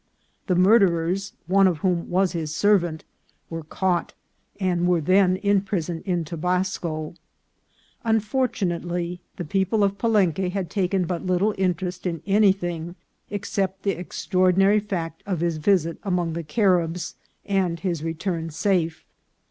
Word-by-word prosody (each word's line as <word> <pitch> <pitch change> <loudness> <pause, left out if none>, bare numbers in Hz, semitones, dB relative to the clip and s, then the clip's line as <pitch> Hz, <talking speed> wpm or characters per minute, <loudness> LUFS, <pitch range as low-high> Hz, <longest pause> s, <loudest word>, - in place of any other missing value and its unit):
The 180 - +2
murderers, 185 -1 +3
one 195 +1 +4
of 175 -4 +1
whom 175 -2 0
was 185 +1 +2
his 160 -3 -3
servant, 175 -6 +2 0.5
were 165 0 -4
caught, 175 +3 -1 0.4
and 180 -2 +1
were 180 -1 +3
then 185 +3 +4
in 200 0 +2
prison 175 -4 -3
in 175 -3 0
Tobasco. 170 -1 -2 0.9
Unfortu 225 +1 +1
nately, 175 0 -3 0.2
the 175 - -5
people 195 +5 +1
of 200 0 0
Palenque 190 -6 +2
had 185 -1 -3
taken 190 -2 +1
but 175 +1 -3
little 185 +4 +2
in 190 -3 0
terest 180 +1 -5
in 165 -3 -4
anything 190 -4 +1 0.3
except 195 -1 -2
the 200 - +2
extraordinary 185 +2 +2
fact 170 -6 -4
of 185 -5 -1
his 170 -2 0
visit 165 0 +1
among 180 -4 -1
the 170 - -3
Caribs 175 0 +1 0.3
and 185 -4 0
his 170 -5 -2
return 165 0 -3
safe. 165 -1 0
180 Hz, 140 wpm, -24 LUFS, 170-195 Hz, 0.9 s, one